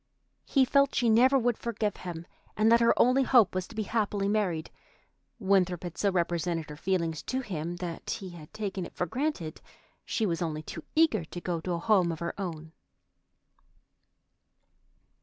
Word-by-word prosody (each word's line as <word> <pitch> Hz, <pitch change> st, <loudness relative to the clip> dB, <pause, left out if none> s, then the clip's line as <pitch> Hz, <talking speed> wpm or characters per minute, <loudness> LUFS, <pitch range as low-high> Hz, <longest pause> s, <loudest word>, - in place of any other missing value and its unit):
He 270 Hz, -2 st, +4 dB
felt 280 Hz, +2 st, +3 dB
she 240 Hz, -2 st, +2 dB
never 255 Hz, +5 st, +5 dB
would 245 Hz, -2 st, +1 dB
forgive 215 Hz, -3 st, -2 dB
him, 170 Hz, -2 st, -7 dB, 0.3 s
and 215 Hz, +1 st, +4 dB
that 235 Hz, -, +7 dB
her 235 Hz, 0 st, +5 dB
only 255 Hz, +3 st, +5 dB
hope 245 Hz, -6 st, +5 dB
was 185 Hz, -1 st, -2 dB
to 225 Hz, -, -13 dB
be 215 Hz, -, -1 dB
happily 205 Hz, -2 st, -1 dB
married. 195 Hz, -6 st, 0 dB, 0.7 s
Winthrop 190 Hz, -5 st, +1 dB
had 175 Hz, -2 st, -6 dB
so 200 Hz, -, +1 dB
represented 170 Hz, -3 st, -1 dB
her -, -, -7 dB
feelings 170 Hz, -2 st, -1 dB
to 260 Hz, +1 st, -2 dB
him 175 Hz, -7 st, -4 dB
that 175 Hz, -1 st, -6 dB
he 190 Hz, -2 st, -4 dB
had 160 Hz, -3 st, -12 dB
taken 200 Hz, -3 st, -4 dB
it -, -, -9 dB
for 180 Hz, -, -1 dB
granted 215 Hz, -, -3 dB, 0.4 s
she 225 Hz, -, -1 dB
was 170 Hz, -3 st, -1 dB
only 155 Hz, -2 st, -2 dB
too 160 Hz, -, -8 dB
eager 305 Hz, -, +3 dB
to 175 Hz, -, -7 dB
go 175 Hz, -2 st, -3 dB
to 180 Hz, +1 st, -2 dB
a -, -, -1 dB
home 185 Hz, -2 st, +3 dB
of 165 Hz, -, -4 dB
her 170 Hz, +1 st, -3 dB
own. 160 Hz, -4 st, -5 dB
185 Hz, 175 wpm, -29 LUFS, 170-225 Hz, 0.7 s, that